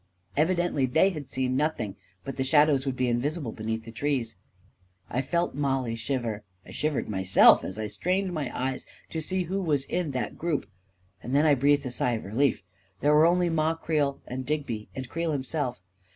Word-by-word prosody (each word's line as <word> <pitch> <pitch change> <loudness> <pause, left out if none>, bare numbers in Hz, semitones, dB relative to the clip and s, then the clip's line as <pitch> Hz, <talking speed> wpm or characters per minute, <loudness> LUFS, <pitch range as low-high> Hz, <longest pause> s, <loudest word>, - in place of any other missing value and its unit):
Evidently 165 -3 +2
they 160 +10 +4
had 150 -6 -7
seen 130 -1 -1
nothing 130 -9 -1
— 90 +1 -38
but 135 - -5
the 130 - -1
shadows 145 0 +4
would 130 - -1
be 125 0 0
invisible 130 +2 -1
beneath 110 +1 -4
the 115 - -9
trees... 120 -2 -1 0.8
I 125 - +1
felt 170 +6 0
Mollie 135 -4 0
shiver 115 -2 -2
— 90 +1 -39
I - - -12
shivered 150 -2 -1
myself, 95 -2 +5
as 95 - -5
I 110 - -2
strained 180 - -1
my 150 -6 -2
eyes 130 0 -2 0.2
to 160 - -2
see 185 +4 -1
who 190 +3 -2
was 150 -6 +1
in 170 +2 -2
that 125 - -3
group; 165 -3 -1 0.6
and 125 +4 -3
then 145 +2 +4
I 150 - +6
breathed 140 +1 +3
a 130 - -3
sigh 125 0 0
of 110 - -4
relief. 115 +3 +1 0.4
There 145 +1 +4
were 155 +2 +6
only 175 0 +2
Ma 160 0 +1
Creel 150 -4 0
and 130 +1 -5
Digby 130 -6 -3
and 130 -1 -5
Creel 165 +2 -2
himself. 135 - -2
140 Hz, 195 wpm, -27 LUFS, 120-155 Hz, 0.8 s, I